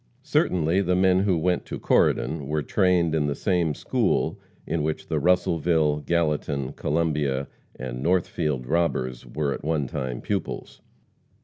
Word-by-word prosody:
Certainly 90 +2 +2
the 90 -1 +1
men 95 0 +4
who 95 -3 +2
went 90 +2 +1
to - - -5
Corydon 75 -4 +1
were 75 0 -1
trained 90 0 +2
in 75 -2 +1
the 70 - -1
same 85 -6 0
school - - 0 0.3
in 80 0 -1
which 75 +1 -3
the - - +1
Russellville, 85 -3 +2
Gallatin, 75 -4 -1
Columbia 75 -3 0 0.3
and 65 -1 -6
Northfield 75 -5 0
robbers 65 -5 -1
were 70 -1 -1
at - - -7
one 75 -2 0
time 65 -2 -4
pupils. - - -4
80 Hz, 140 wpm, -25 LUFS, 70-85 Hz, 0.3 s, men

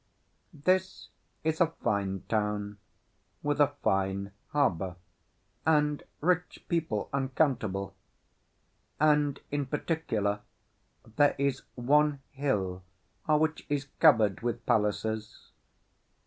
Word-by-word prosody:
This 185 +4 0 0.3
is 160 +2 0
a 170 - +6 0.2
fine 95 -2 0
town, 105 -1 -1 0.6
with 145 0 0
a 145 0 +3
fine 95 -1 0 0.2
harbour, 95 - 0 0.7
and 150 -2 +2 0.2
rich 180 +2 0
people 160 - -1
uncountable; 130 -8 0 1.1
and, 150 -2 +3
in 145 -2 -1
particular, 120 -9 -1 0.8
there 145 -1 +5
is 140 -1 0
one 145 +3 +3
hill 100 -10 -1 0.5
which 155 +1 +2
is 145 -1 -1
covered 110 - +5
with 120 -1 -3
palaces. 110 -1 -1
135 Hz, 90 wpm, -29 LUFS, 105-150 Hz, 1.1 s, a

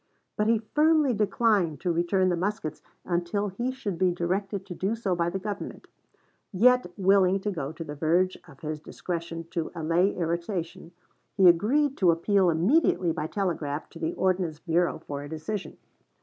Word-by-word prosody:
But 210 - 0
he 230 0 +4
firmly 300 +5 +2
declined 205 - +1
to 180 - 0
return 180 +3 +2
the 175 - +1
muskets 180 -4 -3 0.2
until 180 +4 -1
he 240 +7 -2
should 210 -9 -5
be 185 - +4
directed 190 +3 -2
to 190 - -7
do 195 +5 -1
so 210 -5 -1
by 170 0 0
the 175 - -3
Government. 205 +1 -6 0.7
Yet 245 0 +4
willing 195 -1 +4
to 205 - -2
go 150 -6 -4
to 165 +1 -7
the 145 - -7
verge 170 +5 +1
of - - -16
his 155 -1 -4
discretion 165 +1 -5
to 165 -3 -3
allay 170 +4 +1
irritation, 170 0 -3 0.5
he 190 -2 +7
agreed 260 - +3
to 185 - +4
appeal 180 +3 +3
immediately 180 - +2
by 160 -1 -3
telegraph 160 -6 -3
to 165 - -11
the 160 +1 -2
Ordnance 180 -4 0
Bureau 170 +1 0
for 140 -1 -5
a 145 - -8
decision. 160 +6 -5
180 Hz, 170 wpm, -27 LUFS, 165-205 Hz, 0.7 s, he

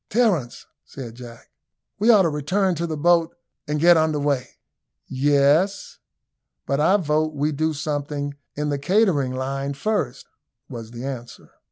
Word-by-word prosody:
"Terence," 205 - 0 0.2
said 125 -5 -9
Jack, 120 -1 -12 0.5
"we 215 +4 +2
ought 210 -5 +7
to 165 - +2
return 180 +6 0
to 170 +1 -3
the 155 -1 -4
boat, 170 +1 +2 0.3
and 150 0 -1
get 170 +2 +6
under 155 -1 +1
weigh." 140 -4 -2 0.5
"Yes; 145 +8 +1 0.7
but 140 - -1
I 175 +7 +4
vote 155 -3 0
we 145 +2 0
do 155 +2 0
something 145 -1 -3 0.2
in 150 0 -2
the 145 -1 -1
catering 150 - +2
line 135 +2 -3
first," 140 - -2 0.4
was 115 -3 -8
the 120 +2 -8
answer. 125 -3 -8
150 Hz, 150 wpm, -23 LUFS, 140-170 Hz, 0.7 s, ought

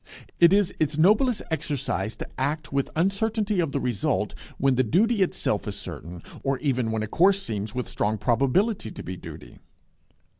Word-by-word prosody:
It 170 0 +7
is 200 -2 +3
its 155 -1 0
noblest 210 +8 +4
exercise 135 -9 -2
to - - -7
act 145 +3 -2
with 140 -1 0
uncertainty 205 +3 +1
of 165 -5 +1
the 140 - -1
result, 120 -6 -1 0.2
when 135 0 +3
the 130 - +3
duty 205 - +2
itself 185 - 0
is - - -3
certain, 85 0 -8 0.2
or 135 -1 0
even 125 -6 0
when 110 -1 -1
a - - -3
course 190 - +4
seems 105 0 -4
with 125 -2 -2
strong 105 +1 -1
probability 135 - +1
to - - -8
be 90 - -5
duty. - - -11
140 Hz, 175 wpm, -25 LUFS, 120-190 Hz, 0.2 s, It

